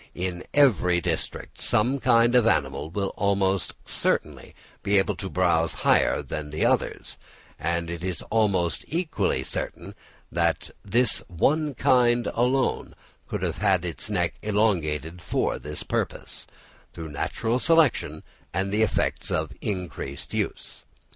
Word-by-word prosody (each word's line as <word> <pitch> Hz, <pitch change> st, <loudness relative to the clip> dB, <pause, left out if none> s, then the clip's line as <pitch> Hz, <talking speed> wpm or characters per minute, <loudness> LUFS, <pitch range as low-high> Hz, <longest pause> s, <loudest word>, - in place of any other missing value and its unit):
In 90 Hz, -1 st, -3 dB
every 95 Hz, -, +4 dB
district -, -, -4 dB
some 110 Hz, +4 st, +3 dB
one 140 Hz, -, -2 dB
kind 120 Hz, -1 st, +4 dB
of 125 Hz, -2 st, +5 dB
animal 70 Hz, -3 st, +1 dB
will 95 Hz, +3 st, -2 dB
almost 100 Hz, -2 st, +1 dB
certainly -, -, -2 dB, 0.3 s
be 100 Hz, 0 st, +2 dB
able 95 Hz, +1 st, +2 dB
to 95 Hz, -, -4 dB
browse 85 Hz, -3 st, +2 dB
higher -, -, +3 dB
than 75 Hz, -1 st, -5 dB
the 75 Hz, +1 st, -1 dB
others; -, -, -1 dB, 0.4 s
and 85 Hz, +1 st, -1 dB
it 85 Hz, 0 st, -6 dB
is 90 Hz, -2 st, -3 dB
almost 100 Hz, -6 st, +1 dB
equally 170 Hz, 0 st, -1 dB
certain -, -, -5 dB, 0.4 s
that -, -, 0 dB
this 115 Hz, +3 st, +2 dB
one 145 Hz, -, +1 dB
kind 120 Hz, -1 st, +3 dB
alone 125 Hz, +2 st, 0 dB, 0.3 s
could -, -, -4 dB
have 95 Hz, -4 st, +1 dB
its 85 Hz, +4 st, -2 dB
neck 90 Hz, -5 st, 0 dB
elongated 90 Hz, -7 st, 0 dB
for -, -, -1 dB
this 75 Hz, +1 st, -6 dB
purpose, -, -, -4 dB, 0.5 s
through 80 Hz, -1 st, -7 dB
natural 110 Hz, -, -1 dB
selection 165 Hz, -2 st, +2 dB, 0.3 s
and 95 Hz, +1 st, 0 dB
the 105 Hz, +2 st, +1 dB
effects 110 Hz, -, 0 dB
of -, -, -1 dB
increased 90 Hz, -8 st, -5 dB
use. -, -, -4 dB
95 Hz, 135 wpm, -25 LUFS, 85-115 Hz, 0.5 s, of